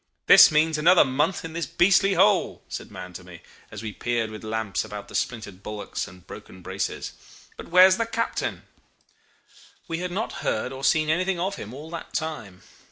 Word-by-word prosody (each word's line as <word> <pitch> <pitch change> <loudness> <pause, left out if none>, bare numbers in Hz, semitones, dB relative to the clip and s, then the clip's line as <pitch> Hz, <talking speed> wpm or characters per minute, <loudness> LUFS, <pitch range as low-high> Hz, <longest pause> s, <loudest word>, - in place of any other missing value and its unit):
'This - - +9
means 155 0 +2
another 175 +2 +6
month 150 +7 0
in 160 - -7
this 170 0 -3
beastly 195 +2 +3
hole,' 190 0 +2
said - - -7
Mahon 90 -2 -9
to 90 - -9
me, 90 -2 -13 0.3
as 105 +1 -9
we 110 -2 -5
peered 115 0 -2
with 110 0 -9
lamps 110 -2 -2
about 105 -1 -8
the - - -14
splintered 105 -6 -4
bulwarks 105 0 -5
and 90 -1 -15
broken 95 -1 -12
braces. - - -4 0.4
'But - - -10
where's 185 +2 +6
the 230 - -1
captain?' 230 0 -3 1.2
"We 165 0 -3
had 180 0 -3
not 200 +6 -3
heard 110 - -2
or 135 +1 -9
seen 155 +2 +3
anything 185 +2 0
of 195 +3 -2
him 105 - -8
all 150 +5 -10
that 170 - -8
time. 130 -13 -5
150 Hz, 185 wpm, -25 LUFS, 105-180 Hz, 1.2 s, This